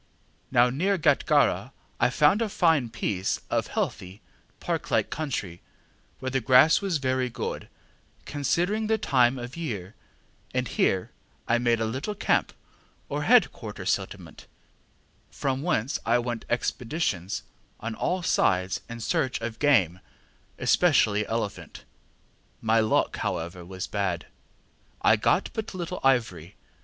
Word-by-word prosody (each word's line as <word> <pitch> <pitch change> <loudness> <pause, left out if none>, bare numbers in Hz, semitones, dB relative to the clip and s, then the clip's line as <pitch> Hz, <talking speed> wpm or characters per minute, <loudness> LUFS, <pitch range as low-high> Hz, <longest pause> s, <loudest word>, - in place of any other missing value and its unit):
Now 125 -1 +4
near 190 +9 +1
Gatgarra 160 - +2 0.3
I - - +4
found 150 - +3
a 225 - 0
fine 160 -10 +2
piece 95 -3 -2
of - - 0
healthy, 95 +3 -4 0.4
park - - -3
like - - +1
country, 115 - -4 0.6
where 130 0 -4
the 130 0 0
grass 130 +8 +6
was 190 -5 0
very 130 -2 0
good, 120 - -5 0.6
considering 175 - 0
the 220 0 +2
time 130 - +3
of 125 +1 -7
year; 110 - -5 0.6
and 125 -1 0
here 95 -1 0 0.4
I 120 +1 +3
made 120 -1 +2
a 115 - 0
little 130 - -3
camp - - +1 0.6
or - - -2
head - - +5
quarter - - -8
settlement, - - -3 0.8
from 135 -1 -2
whence 140 -6 0
I 115 +2 +3
went 120 -1 -3
expeditions 120 - -2 0.4
on 115 +1 -4
all 180 +10 -1
sides 95 - +1
in 120 0 -7
search 130 +3 0
of 115 0 -5
game, 100 - +3 0.6
especially 105 - +3
elephant. 110 -3 -4 0.8
My 110 0 +2
luck, 110 -1 +1
however, 85 +2 -3
was 95 +1 -6
bad; 100 -5 -2 0.8
I - - +6
got - - +1
but 220 -3 -5
little 180 0 -4
ivory. 110 -10 +1
125 Hz, 130 wpm, -26 LUFS, 105-150 Hz, 0.8 s, grass